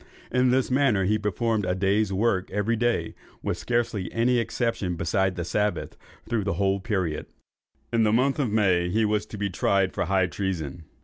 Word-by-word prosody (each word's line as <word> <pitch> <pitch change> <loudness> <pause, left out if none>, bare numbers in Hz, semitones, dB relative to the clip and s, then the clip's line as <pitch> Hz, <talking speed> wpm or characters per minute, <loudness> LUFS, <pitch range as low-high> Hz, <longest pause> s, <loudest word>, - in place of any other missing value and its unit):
In 125 0 +3
this 130 +1 +1
manner 125 -8 +3
he 105 +3 +2
performed 105 +1 0
a 90 0 0
day's 100 +2 +1
work 95 -1 +1
every 105 +3 0
day, 120 +1 0 0.3
with - - -2
scarcely 115 -6 -1
any 120 +1 +2
exception 115 -5 -1
beside 95 +3 0
the 85 -2 -3
Sabbath, 105 +3 -1 0.3
through 115 -3 0
the 100 -1 -1
whole 95 +2 +1
period. 95 -7 -2 0.7
In 115 - +3
the 110 -1 +3
month 135 +6 +2
of 135 -5 +1
May 95 -5 +2
he 110 +4 +2
was 105 0 0
to 105 - -8
be 100 -1 -2
tried 95 +1 +1
for - - -1
high 95 -1 +2
treason. 85 -5 -4
105 Hz, 185 wpm, -26 LUFS, 95-115 Hz, 0.7 s, In